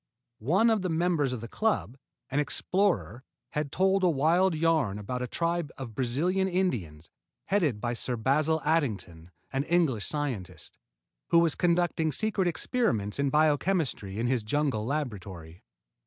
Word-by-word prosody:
One 190 - +3
of 220 -3 +1
the 185 - -2
members 165 -4 +1
of 125 -3 -4
the 115 - -6
club, 215 - -1 0.4
an 140 - +1
explorer, 170 - 0 0.3
had 150 -2 -2
told 190 +2 +2
a 180 - +5
wild 165 +5 +2
yarn 155 -10 +1
about 125 +5 -4
a 125 - -2
tribe 170 +1 -1
of 130 -4 -7
Brazilian 155 - 0
Indians, 110 - -2 0.3
headed 160 - +1
by 120 +2 -2
Sir 120 +1 -3
Basil 150 +7 +1
Addington, 100 - -1 0.2
an 135 +1 0
English 160 -11 +1
scientist, 105 - -5 0.5
who - - +3
was 170 -2 +4
conducting 170 -2 +1
secret 200 0 +1
experiments 130 - -1
in 140 0 +2
biochemistry 150 - +1
in 115 - -1
his 125 -1 +1
jungle 115 -1 -1
laboratory. 95 - -5
145 Hz, 145 wpm, -28 LUFS, 115-175 Hz, 0.5 s, a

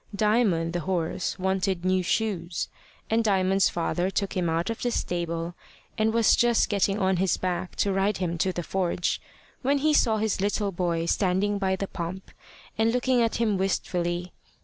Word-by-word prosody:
Diamond 205 -6 +2
the 175 - -1
horse 175 0 -2
wanted 190 -1 -1
new 185 0 +2
shoes, 180 -3 -1 0.4
and 225 +1 +2
Diamond's 195 -2 +3
father 175 +2 -1
took 195 +1 -2
him 180 -3 0
out 165 +6 0
of 230 - -6
the 245 - +1
stable, 170 -5 -2 0.4
and 220 0 +2
was 230 0 +4
just 240 -1 +3
getting 200 -1 +1
on 190 -2 +1
his 190 +1 +1
back 180 0 -3
to 200 - +1
ride 195 +1 +1
him 175 -2 -2
to 185 +3 +2
the 175 -1 -4
forge, 180 0 -1 0.4
when 275 +2 +2
he 305 +2 +2
saw 225 -6 +3
his 215 -2 0
little 205 0 0
boy 170 -2 -1
standing 195 +3 +1
by 190 -1 +1
the 195 +1 -4
pump, 185 +2 -6 0.5
and 225 +1 +3
looking 250 0 +2
at 230 -1 +1
him 215 -4 +1
wistfully. 175 -2 -1
190 Hz, 175 wpm, -26 LUFS, 175-215 Hz, 0.5 s, was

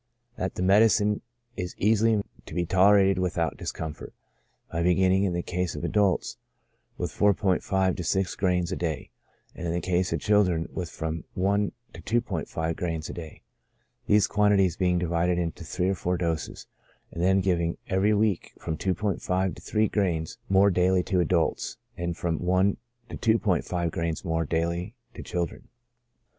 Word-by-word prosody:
That - - -3
the 90 - -2
medicine 105 +1 +4 0.3
is 90 0 -5
easily 110 +2 +3
made 100 - 0 0.2
to - - -8
be 90 -1 0
tolerated 95 +1 +4
without 90 -2 0
discomfort, 80 -2 -6 0.6
by 85 - -1
beginning, 95 +2 +3
in 90 - 0
the 85 0 -2
case 90 -1 -2
of - - -6
adults, 100 -4 +1 0.6
with - - -3
4*5 95 -2 +2
to 90 - -3
6 95 +2 0
grains 90 -2 0
a - - -1
day, 80 -5 -3 0.4
and 85 - -5
in - - -1
the 85 - 0
case 90 0 0
of - - 0
children 90 -6 +2
with 90 -3 -4
from 80 0 -4
i 100 +2 +2 0.2
to - - -10
2*5 85 -8 -2
grains 80 -3 -3
a - - -7
day, 80 -3 -9 0.6
these 105 -1 +5
quantities 100 -4 +3
being 90 -1 +1
divided 85 0 +1
into 85 -1 -3
three 90 +3 -1
or - - +2
four 90 -1 -1
doses; 85 -2 -3 0.5
and 85 - -5
then 95 +2 +4
giving, 85 -3 0
every 100 +3 +2
week, 105 -4 0
from 80 -2 -4
2*5 95 -1 -1
to - - -12
three 110 0 +1
grains 85 -7 -1
more 100 +1 +5
daily 90 +1 +3
to 95 0 0
adults, 85 -1 0 0.2
and 85 -1 -3
from 85 -2 -1
i 95 +2 +3 0.3
to 115 -2 +1
2*5 85 -3 0
grains 85 +2 -3
more 80 -1 0
daily 85 - -2 0.2
to - - -8
children. 85 -2 -4
90 Hz, 165 wpm, -27 LUFS, 85-95 Hz, 0.6 s, these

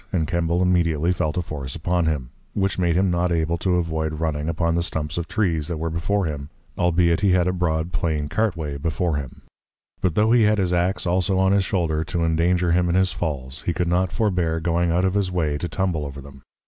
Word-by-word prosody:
and 80 -4 0
Kembal 85 +1 0
immediately 85 -2 +2
felt 80 -2 -2
a 90 - 0
force 70 -5 -6
upon 85 +1 0
him, 70 -6 -2 0.2
which 95 -1 0
made 85 -2 +2
him 95 0 +2
not 85 0 +1
able 85 0 0
to 90 0 +1
avoid 80 -2 -1
running 80 -1 -1
upon 85 0 0
the 85 - +1
stumps 80 -3 -3
of 85 -1 -3
Trees, 85 -8 0
that 85 -2 -3
were 80 +1 -3
before 95 +4 0
him, 75 -3 -4 0.3
albeit 85 -1 +2
he 100 -3 +3
had 90 -1 +3
a 90 - +1
broad, 85 -1 -1
plain 80 -4 -1
Cart 110 +3 0
way, 75 -3 -4
before 80 +2 -1
him; 70 -3 -7 0.6
but 90 -4 0
tho' 110 +2 +3
he 120 0 +5
had 105 0 +4
his 90 -3 +1
Ax 90 +3 0
also 90 +2 +1
on 95 0 +3
his 100 -1 +3
Shoulder 80 -4 0
to 85 +1 -1
endanger 85 +2 +2
him 90 +1 +2
in 85 - +1
his 95 0 +2
Falls, 70 -4 -4
he 85 - +2
could 90 -1 -1
not 90 +1 +1
forbear 90 -7 0
going 85 +1 +1
out 90 +3 +2
of 95 - +1
his 100 -2 0
way 80 -5 0
to 85 - -3
tumble 90 -6 -1
over 70 -1 -7
them. 70 0 -12
85 Hz, 230 wpm, -23 LUFS, 80-90 Hz, 0.6 s, he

